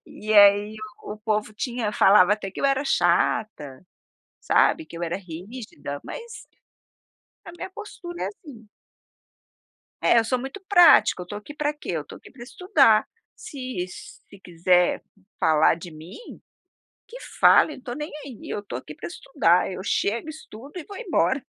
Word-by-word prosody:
E 215 +1 -4
aí 205 +1 +6 0.3
o 210 - -6
povo 215 0 -2
tinha 235 -1 -3
falava 195 -1 +5
até 205 -2 -3
que - - -8
eu - - -2
era 275 +1 +2
chata, 185 - 0 0.6
sabe, 320 - +2
que 170 - -11
eu - - -7
era 170 0 -2
rígida, 180 - -8
mas 470 -1 -9 1.0
a - - -9
minha 350 - -8
postura 375 -4 -8
é - - -1
assim. 270 - -12 1.3
É, - - +4
eu 225 - +2
sou 250 +3 0
muito 270 +10 -7
prática, 350 - +6
eu - - -7
estou 205 +3 -7
aqui 255 +8 -11
pra 295 0 -1
quê? 295 - -7
Eu 160 -3 -2
estou - - -12
aqui - - -16
pra 255 - -14
estudar. 275 - +3 0.3
Se 255 -9 -6
se 195 +2 -13
quiser 180 0 +1 0.4
falar 155 0 +4
de 170 +1 -10
mim, 160 - -12 0.7
que - - -11 0.2
fale, 305 - +6
não - - -10
estou 245 -1 -7
nem 300 +2 -6
aí, 260 -6 -10
eu - - -3
estou 200 -11 -7
aqui 150 +3 -11
pra - - -8
estudar, 180 - +1
eu 185 - -6
chego, 225 +7 -1
estudo 285 -4 -11
e 335 - -7
vou 405 - -10
embora, 340 - 0
215 Hz, 165 wpm, -24 LUFS, 185-290 Hz, 1.3 s, aí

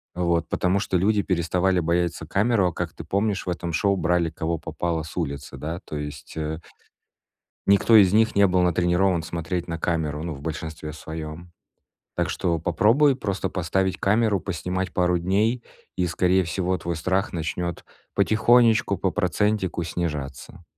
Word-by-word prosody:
Вот, 85 -2 0
потому 90 +2 +1
что 95 -2 0
люди 105 +3 +2
переставали 90 0 +1
бояться 85 0 0
камеру, 100 +3 +2
а, - - -9
как - - -4
ты - - -9
помнишь, 100 0 -1
в - - -3
этом 85 -1 -3
шоу 100 +5 +2
брали 85 -1 +1
кого 80 +1 -2
попало 85 0 -3
с 80 - -10
улицы, 70 -5 -4
да. 80 +5 -4
То - - -7
есть 75 0 -7
э 80 0 -2 1.1
Никто 100 +3 +6
из 95 -2 +6
них 110 +1 +4
не 100 0 +5
был 90 0 +2
натренирован 90 +1 +2
смотреть 85 +2 -3
на 85 -1 -3
камеру, 80 -3 -1
ну, 85 -1 -3
в 70 - -10
большинстве 80 0 -5
своём. 80 +2 -8 0.7
Так - - 0
что 85 -2 0
попробуй 110 - +3
просто 100 -7 -3
поставить 95 +1 -1
камеру, 105 -1 +2
поснимать 95 0 -3
пару 90 -1 +2
дней 105 +7 +1 0.3
и, 90 - +1
скорее 90 +2 +2
всего, 90 +2 -1
твой 85 0 -3
страх 95 +5 -1
начнёт 85 +1 -3 0.3
потихонечку, 110 -1 +4
по 95 +1 0
процентику 100 0 0
снижаться. 75 -2 -5
90 Hz, 160 wpm, -24 LUFS, 80-95 Hz, 1.1 s, Никто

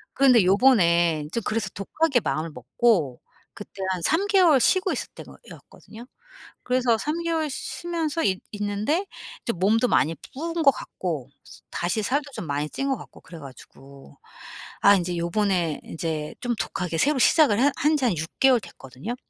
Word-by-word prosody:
그런데 255 -6 +5
요번에 175 - +3
저 235 - -1
그래서 215 -1 -2
독하게 270 +7 0
마음을 160 -5 -2
먹고 135 - 0 0.3
그때 200 -1 -10
한 185 -1 -2
3 330 - +1
개월 360 -9 +4
쉬고 375 +8 +2
있을 - - -4
땐 - - -11
거였거든요. 230 +2 -14 0.6
그래서 250 -2 +1
3 305 +7 -3
개월 325 -2 -1
쉬 - - -6
쉬면서 330 -2 -2
있 190 -1 0
있는데 210 - -1 0.4
저 235 - -1
좀 180 - -10
몸도 220 +6 +2
많이 160 - +2 0.2
부은 330 +4 -3
것 285 - +7
같고 155 - -6 0.4
다시 180 +5 -1
살도 285 +5 -1
좀 175 - -6
많이 145 +1 -2
찐 275 0 -3
것 270 - 0
같고 - - -14
그래가지고. 140 -3 -14 0.6
아 200 0 +6
이제 180 -1 -2
요번에 170 -2 0
이제 160 -2 -4
좀 245 -1 -1
독하게 175 -3 -3
새로 290 - +2
시작을 255 -4 +4
하 280 +3 +4
한 305 +1 +2
지 280 - -1
한 215 -9 +1
6 160 +1 -3
개월 265 -3 +5
됐거든요. 160 - -8
215 Hz, 310 characters per minute, -24 LUFS, 170-275 Hz, 0.6 s, 것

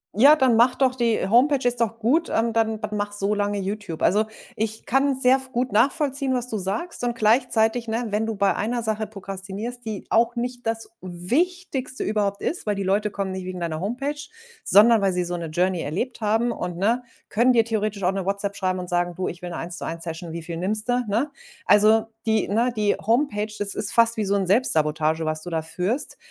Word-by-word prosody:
Ja, 280 +8 +7
dann 260 -5 +3
mache 240 +3 +4
doch 260 -2 +3
die 235 -3 +1
äh, - - -2
Homepage, 255 +4 +3
ist 245 -1 0
doch 230 0 0
gut, 280 +10 +1
ähm, 225 0 0
dann 220 -1 +1
dann 210 -1 -4
mache 205 0 -2
so 200 +1 0
lange 205 0 -1
YouTube. 195 -4 -4
Also, 210 +4 +3 0.3
ich 220 +1 -3
kann 270 +1 +1
sehr 260 +1 +4
gut 250 +1 -1
nachvollziehen, 270 +3 +1
was 245 0 -2
du 220 -4 -3
sagst, 215 - -3
und 240 -1 -1
gleichzeitig, 230 0 +2
ne, 230 +2 -1
wenn 215 +2 -1
du 225 - -2
bei 195 -1 +2
einer 235 +2 -2
Sache 215 -1 -2
prokrastinierst, 200 +4 -6
die 215 -3 -5
auch 235 +2 +3
nicht 245 0 -4
das 225 0 -3
Wichtigste 260 - -2
überhaupt 205 -2 -1
ist, 335 - -3
weil 205 - +1
die 195 - -3
Leute 205 +3 +1
kommen 195 -2 -4
nicht 185 -1 -5
wegen 185 -1 -5
deiner 165 -2 -3
Homepage, 245 - -2 0.5
sondern 220 +2 +6
weil 195 -1 +2
sie 180 0 0
so 175 0 -3
'ne 170 -1 -4
Journey 180 +2 0
erlebt 230 - -4
haben, 225 +3 +1
und, 180 -6 -5
ne, 225 +7 +1 0.3
können 235 +4 +3
dir 230 -2 +4
theoretisch 215 -3 -2
auch 180 - +3
eine 195 -1 -2
WhatsApp 200 +1 -2
schreiben 185 -2 -1
und 180 -1 -5
sagen: 175 0 0
„Du, 185 +1 -2
ich 175 - -9
will 180 - -6
'ne 170 - -5
Eins-zu-eins-Session. 165 -1 -5
Wie 165 0 -6
viel 165 0 -6
nimmst 210 +6 0
du,” 245 0 +3
ne? 240 +9 0 0.3
Also, 215 +2 +5 0.2
die 220 -2 +2
ne, 235 +5 +1
die 210 -1 +2
Homepage, 220 -3 0
das 200 -1 0
ist 210 -1 -1
fast 230 0 +4
wie 215 - 0
so 200 +1 +1
'n 195 -2 +1
Selbstsabotage, 160 -6 +2
was 155 0 -2
du 175 - -7
da 160 -1 -2
führst. 185 - -2
215 Hz, 215 wpm, -23 LUFS, 190-240 Hz, 0.5 s, Ja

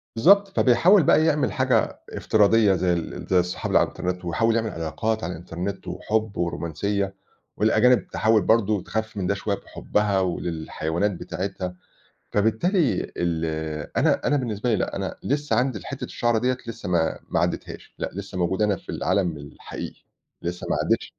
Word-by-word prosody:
بالضبط. 200 - +6
فبيحاول 170 +5 +5
بقى 155 - +4
يعمل 150 -2 +2
حاجة 130 -4 +1
افتراضية 105 -1 +3
زي 90 0 +1
ال 85 - -4
زي 90 -1 +5
الصحاب 90 0 -2
اللي - - +6
على - - +4
الإنترنت 90 0 -4
ويحاول 115 +6 +1
يعمل 110 -1 0
علاقات 110 +7 -2
على 90 - -2
الإنترنت 90 +3 -6
وحُب 110 +4 -2
ورومانسية 95 +4 -2 0.4
والأجانب 110 +4 +4
تحاول 110 -1 +2
برضه 105 -1 +2
تخفِّف 110 -1 -4
من 90 -2 -1
ده 100 - +2
شوية 100 0 -1
بحُبّها 105 -1 -1
و 90 -2 -1
للحيوانات 80 +3 -2
بتاعتها، 95 0 -5 0.6
فبالتالي 125 - +1
ال 85 -2 -1 0.5
أنا - - +2
أنا 145 - +3
بالنسبة 120 -3 -1
لي 110 - +3
لأ، - - -2
أنا - - -3
لسّه 145 -5 0
عندي 125 -2 +1
الحتّة - - -6
الشَعرة 120 -1 0
ديّة 125 +2 +1
لسّه 115 -5 -6
ما 85 -2 +1
ما - - +1
عدّتهاش - - -4
لأ، - - -3
لسّه 95 -1 -6
موجود 95 +4 0
أنا 105 -2 +2
في - - -19
العالم 90 -4 0
الحقيقي، 70 0 -9 0.4
لسّه 85 +1 -4
ما - - +2
عدّتش - - -1
105 Hz, 165 wpm, -24 LUFS, 90-115 Hz, 0.6 s, بالضبط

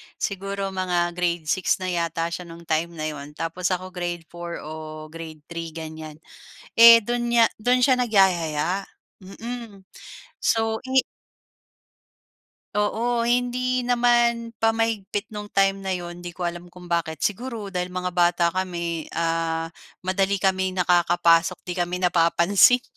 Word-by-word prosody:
siguro 195 0 -3
mga 180 -2 0
Grade 175 -1 -1
6 185 +3 +2
na 185 -1 -4
yata 170 -1 -1
siya 180 - -5
no'ng 170 0 -11
time 165 +1 -1
na 155 - -5
'yon 150 -1 -8
tapos 165 +3 -2
ako 185 +1 -4
Grade 175 -2 -4
4 175 0 -6
o 155 0 -8
Grade 160 -2 -9
3 165 -1 -5
ganyan, 155 -1 -7 0.6
eh, 230 0 +10
do'n 240 +2 -2
niya 235 -1 +6
do'n 245 +4 +2
siya 260 0 +5
nagyaya, 190 -6 +2 0.4
mm, 225 +2 -8 0.6
so 225 -1 +2
ini 260 0 +3 1.7
Oo, 230 +3 0
hindi 245 +1 0
naman 240 -1 +2
pa 225 0 +2
mahigpit 220 -2 -2
nung 210 -1 -6
time 195 -1 +2
na 195 -1 -3
'yon, 175 -1 -6
'di 175 -1 -8
ko 180 - -7
alam 175 0 -3
kung 175 0 -14
bakit. 165 -2 -1
Siguro, 220 -1 -2
dahil 180 -1 -3
mga 180 0 -2
bata 175 -1 +2
kami 170 -3 -3
ah, 165 0 -1 0.3
madali 190 +1 0
kaming 190 -1 +1
nakakapasok, 170 -1 +3
'di 180 - -5
kami 180 +1 -2
napapansin. 180 +7 +4
180 Hz, 140 wpm, -24 LUFS, 170-215 Hz, 1.7 s, eh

